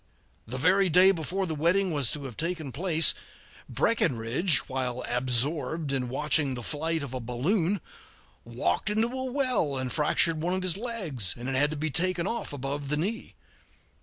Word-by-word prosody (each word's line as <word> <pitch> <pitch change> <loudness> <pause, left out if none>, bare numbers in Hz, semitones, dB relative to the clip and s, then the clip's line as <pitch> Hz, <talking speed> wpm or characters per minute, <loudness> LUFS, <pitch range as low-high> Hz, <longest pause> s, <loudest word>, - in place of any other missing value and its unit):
The 125 +3 -4
very 185 +7 +3
day 185 +4 +7
before 185 +2 -2
the 165 - -3
wedding 175 +5 +2
was 140 -6 +1
to 150 - -4
have 130 -4 -7
taken 165 - -3
place, 165 +3 +2 0.6
Breckinridge, 135 - +1
while 125 -1 -3
absorbed 140 +5 0
in 125 -2 -1
watching 140 0 +1
the 120 - -6
flight 160 +4 -1
of 135 -2 -7
a 130 - -3
balloon, 165 - 0 0.6
walked - - -1
into 220 +2 +2
a 260 +1 -4
well 250 - +1
and 130 -1 -3
fractured 155 +1 +2
one 175 +3 0
of 185 - -2
his 185 -3 0
legs, 190 - -3
and 120 +1 -6
it 135 - -1
had 145 +3 +3
to 155 - -4
be 155 +1 -2
taken 175 +3 0
off 235 - -3
above 140 0 -4
the 150 - +1
knee. 205 +9 -3
155 Hz, 175 wpm, -28 LUFS, 130-185 Hz, 0.6 s, day